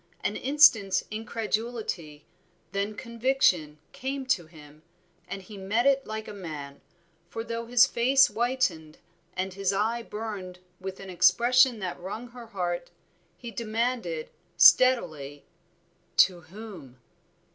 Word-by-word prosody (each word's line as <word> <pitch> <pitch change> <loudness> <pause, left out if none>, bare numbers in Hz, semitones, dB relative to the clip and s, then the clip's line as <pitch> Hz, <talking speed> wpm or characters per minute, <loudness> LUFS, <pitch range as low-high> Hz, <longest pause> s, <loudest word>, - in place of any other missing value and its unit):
An - - -1
instant's 250 -9 +4
incredulity, 215 -8 -4 0.5
then 200 +2 -2
conviction 235 - +1
came 270 +1 -4
to 180 -10 0
him, 150 -2 -16 0.5
and 195 -1 -6
he 205 +1 -11
met 210 +6 0
it 275 -1 +3
like 220 0 -5
a - - -7
man, 150 -7 -8 0.5
for 225 +5 -5
though 230 0 -5
his 245 +1 +6
face 270 +2 +4
whitened 210 -9 -1 0.4
and 185 0 -2
his 195 0 0
eye 220 +4 0
burned 210 -5 -6 0.2
with 190 0 -7
an 195 -1 -8
expression 235 +8 +4
that 180 -2 -4
wrung 215 +7 -7
her 235 -1 -11
heart, 180 +1 -3 0.5
he 240 -2 -8
demanded 225 -8 -2 0.3
steadily, 155 - +4 0.7
"To 180 -2 +5
whom?" 190 - -11
210 Hz, 125 wpm, -27 LUFS, 180-235 Hz, 0.7 s, his